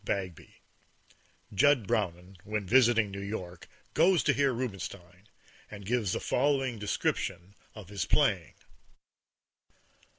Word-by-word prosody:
BAGBY 95 -5 -4 1.0
(Jud 135 +1 +4
Brownin, 95 -2 -2
when 105 -1 -3
visiting 115 -1 +4
New 100 0 -6
York, 90 -4 -6 0.3
goes 180 -2 +4
to - - +3
hear 140 -1 +2
Rubinstein, 100 -5 -6 0.4
and 100 -1 -10
gives 110 -3 0
the - - -1
following 135 -3 0
description 100 -2 -2 0.2
of 105 -5 -10
his 100 -5 -3
playing.) - - +1
105 Hz, 110 wpm, -30 LUFS, 95-125 Hz, 1.0 s, Jud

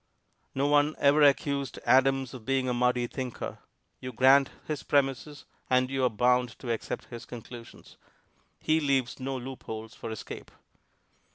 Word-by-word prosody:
No 135 +1 +1
one 145 +1 +3
ever 145 +2 +4
accused 140 -1 +2
Adams 135 0 +3
of 125 -4 -9
being 135 +2 0
a 125 - 0
muddy 125 0 +1
thinker; 125 -1 -6 0.4
you 130 - -6
grant 135 +3 +5 0.2
his 155 -2 -3
premises 140 +1 -1 0.2
and 130 0 +2
you 135 -1 0
are 125 - +4
bound 125 +1 +1
to 120 - -4
accept 115 - -4
his 120 0 -7
conclusions. 120 -1 -11 0.6
He 155 +1 +2
leaves 135 -5 0
no 135 +1 -3
loopholes 115 -3 -7
for - - -7
escape. 110 - -8
130 Hz, 150 wpm, -28 LUFS, 125-140 Hz, 0.6 s, grant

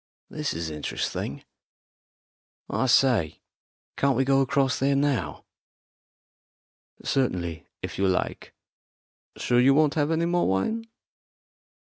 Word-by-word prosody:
This 150 -1 -3
is 80 -1 -4
interesting. 75 -1 -4 1.2
I 130 - 0
say, 120 - +2 0.5
can't 140 -3 +2
we 135 - +2
go 135 0 +3
across 135 0 +1
there 140 +1 +2
now?" 135 - -1 1.6
"Certainly, 85 -11 -1 0.2
if - - -5
you 95 - +3
like. 95 -1 -2 0.8
Sure 120 - +2
you 135 +2 +5
won't 155 -1 +3
have 150 -1 0
any 165 +1 +1
more 175 +1 +1
wine? 220 - -1
135 Hz, 110 wpm, -26 LUFS, 95-145 Hz, 1.6 s, you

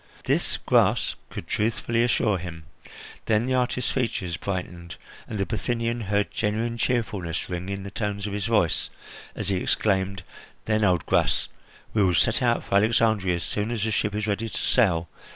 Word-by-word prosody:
This - - +1
Gras - - +3 0.2
could - - -7
truthfully 115 +2 0
assure 110 -5 +2
him. 80 -2 -7 0.6
Then 110 +1 +3
the 130 - 0
artist's 125 -1 0
features 100 -9 -1
brightened, 90 -3 -5 0.3
and 110 - -4
the 100 - 0
Bithynian 115 +3 -1
heard 100 +1 0
genuine 115 +3 -1
cheerfulness 100 -8 -1
ring 90 +1 -4
in 100 0 -4
the 100 - -7
tones 100 -1 -3
of 105 - -3
his 100 +1 -2
voice 105 -7 +2 0.5
as 105 -2 -3
he 95 - +1
exclaimed: 95 -1 +1 0.4
"Then, 110 0 +1
old 90 -5 +2
Gras, - - +2 0.4
we 110 - +2
will 90 -3 +3
set 115 +8 +3
out 120 -1 +2
for 100 - +2
Alexandria 110 -3 +3
as 85 - -3
soon 105 +1 -1
as 115 -3 -2
the 110 - 0
ship 105 0 0
is 105 0 -1
ready 110 +2 -1
to - - -5
sail. 85 -9 +2
105 Hz, 175 wpm, -25 LUFS, 95-115 Hz, 0.6 s, Gras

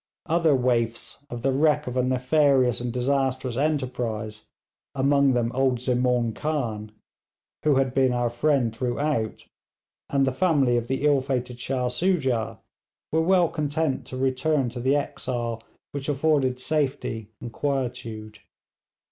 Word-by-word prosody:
Other 165 -2 +3
waifs 120 0 -1
of 120 -2 -6
the 135 - +2
wreck 150 +2 +2
of 125 - -5
a 130 - +3
nefarious 130 -1 +2
and 120 -1 -2
disastrous 130 0 0
enterprise, 125 -7 -2 0.5
among 140 0 +3
them 120 -1 0
old 130 -1 +2
Zemaun 125 -2 +1
Khan, 115 -9 -3 0.7
who 150 -2 +3
had 135 -1 +1
been 130 -1 +3
our 120 -1 0
friend 120 -2 +1
throughout, 125 -1 -2 0.6
and 140 -1 +2
the 130 - +1
family 135 -4 +2
of 120 -1 -1
the 135 +3 -1
ill 145 -2 +4
fated 125 -2 -3
Shah 125 0 -1
Soojah, 130 - 0 0.5
were 160 - +2
well 180 +1 +4
content 150 -2 -1
to 130 - -6
return 135 +1 +1
to 120 +1 -7
the 130 +3 +2
exile 120 -5 -3 0.3
which 140 0 -4
afforded 140 -3 +1
safety 130 -7 -2
and 120 -1 -8
quietude. 115 -6 -3
130 Hz, 140 wpm, -25 LUFS, 120-145 Hz, 0.7 s, ill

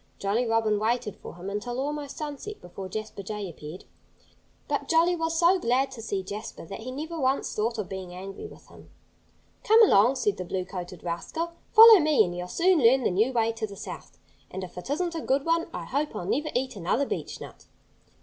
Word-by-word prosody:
Jolly 215 +5 0
Robin 225 -2 +2
waited 230 0 -1
for - - -10
him 175 +2 -9
until 225 +5 -3
almost 290 0 -4
sunset 305 +8 -6
before 185 +2 -8
Jasper 215 0 -5
Jay 210 0 -5
appeared. 160 +1 -9 0.8
But - - -2
Jolly 335 +2 +4
was 325 -1 -1
so 355 +3 +4
glad 265 -1 +1
to 245 -4 -8
see 200 -4 -3
Jasper 200 -2 -7
that 195 - -8
he 230 +3 -7
never 315 +5 -5
once 265 0 0
thought 230 +2 -1
of 210 -4 -3
being 190 -2 -7
angry 195 - -8
with - - -15
him. - - -16 0.7
"Come 445 +1 +7
along!" 235 - +5
said 205 -6 0
the 185 - -4
blue 185 +1 -3
coated 180 -1 -7
rascal. 180 - -3 0.2
"Follow 450 -2 +10
me 300 -7 +4
and 175 0 -5
you'll 180 0 -5
soon 350 - +3
learn 255 +1 +5
the - - +2
new 215 +8 +2
way 230 -2 +1
to 225 -1 -4
the 200 - -10
South. - - -9 0.3
And 190 +1 -6
if 180 - -9
it 180 +7 -8
isn't 340 +4 -1
a 325 - -3
good 275 0 0
one 330 0 +1
I - - -6
hope 285 -1 -2
I'll 180 - -4
never 295 - 0
eat 255 0 -1
another 200 +9 0
beechnut." - - -6
230 Hz, 205 wpm, -27 LUFS, 195-300 Hz, 0.8 s, Follow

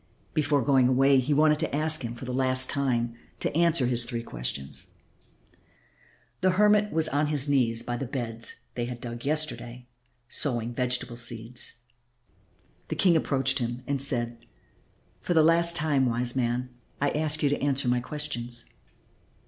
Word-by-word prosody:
Before 145 -2 +1
going 135 -3 +3
away 135 +1 +4
he 130 +4 -2
wanted 150 +1 +3
to 160 -3 -2
ask 155 -1 +4
him 120 0 -5
for 115 - -9
the 125 - -5
last 130 0 +4
time 125 -4 -1 0.3
to - - -2
answer 170 -5 +3
his 120 -1 +1
three 120 -1 -5
questions. 70 - -4 1.5
The 185 - +3
hermit 210 0 +3
was 160 0 +1
on 145 +2 0
his 145 -2 +2
knees 120 -5 +1
by 120 0 -4
the 135 - -5
beds 115 -3 -5
they 120 - -3
had 120 0 -7
dug 120 0 -7
yesterday, 125 -5 -1 0.4
sowing 120 -3 -1
vegetable 125 -1 -1
seeds. 120 0 -5 1.1
The - - -4
King 180 -3 +3
approached 135 -4 +1
him 120 +1 -4
and 140 -2 -2
said, 120 -3 +1 0.8
"For 175 - -2
the 160 - +5
last 170 +1 +4
time, 150 -5 +2
wise 120 +1 -1
man, 125 0 -1 0.3
I 145 0 +1
ask 155 0 0
you 145 - +3
to 145 - -2
answer 140 -2 0
my 125 0 +2
questions." 120 -4 -4
130 Hz, 160 wpm, -26 LUFS, 120-150 Hz, 1.5 s, the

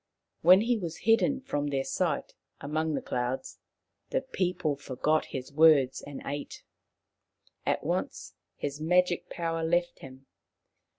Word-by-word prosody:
When 185 +4 +7
he 230 0 +1
was 170 -3 -6
hidden 235 +4 +3
from 145 - -2
their 135 -2 0
sight 135 - -1 0.3
among 155 +2 -1
the - - -3
clouds, 125 +2 -3 0.5
the - - 0
people 180 -5 -1
forgot 145 +3 0
his 130 +2 -7
words 150 -4 +5
and 145 -1 -8
ate. 145 +1 -5 1.0
At - - +1
once - - -3 0.2
his 145 +1 -5
magic 180 +2 +2
power 165 -1 -2
left 175 +2 0
him. 130 0 -12
155 Hz, 130 wpm, -29 LUFS, 140-175 Hz, 1.0 s, When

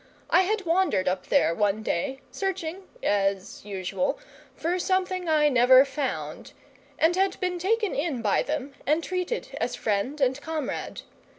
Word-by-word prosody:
I - - +6
had 405 +1 -1
wandered 335 - +2
up 185 0 -1
there 280 - +3
one 205 +3 0
day, 260 +9 -2
searching 380 -1 -4 0.2
(as 195 -1 0
usual) 190 -2 -2 0.4
for 350 +3 -1
something 370 -1 0
I 305 -1 +4
never 255 0 +6
found, 275 -1 -4 0.4
and 330 +2 +3
had 385 0 +1
been 360 -2 -1
taken 425 +3 +1
in 285 -5 -2
by 205 - +3
them 285 -2 -3
and 310 +3 +2
treated 365 +6 -3
as - - -1
friend 220 +8 -1
and 265 0 +1
comrade. 315 -4 -4
300 Hz, 150 wpm, -26 LUFS, 220-365 Hz, 0.4 s, I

